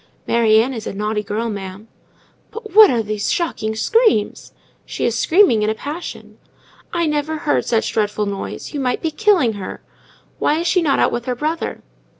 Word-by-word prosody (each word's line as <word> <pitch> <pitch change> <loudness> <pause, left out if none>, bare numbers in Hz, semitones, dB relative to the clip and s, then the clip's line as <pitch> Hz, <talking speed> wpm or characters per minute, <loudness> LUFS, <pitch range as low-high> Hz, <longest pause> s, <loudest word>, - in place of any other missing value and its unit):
"Mary 225 -2 +4
Ann 250 +4 0
is 225 -3 -6
a - - -5
naughty 210 +1 -1
girl, 210 +3 -3
ma'am." 200 0 -7 0.6
"But 450 -1 -9
what 430 0 +9
are 235 -3 +1
these 210 -1 -2
shocking 220 -11 -2
screams?" 440 - +1 0.3
"She - - -4
is 235 - 0
screaming 320 - +4
in 210 - +1
a 220 - -1
passion." 300 +8 -8 0.5
"I 340 -1 0
never 300 +1 -1
heard 300 - 0
such 225 -2 0
a - - -14
dreadful 210 -1 0
noise! 200 +8 -6
You 290 - -3
might 250 -2 -1
be 325 - 0
killing 365 - +2
her. 200 -2 -7 0.6
Why 300 - +2
is 335 - -2
she 360 +1 +2
not 290 -5 +2
out - - +2
with 240 0 -3
her 250 - -2
brother?" 310 +6 -3
240 Hz, 190 wpm, -19 LUFS, 215-320 Hz, 0.6 s, what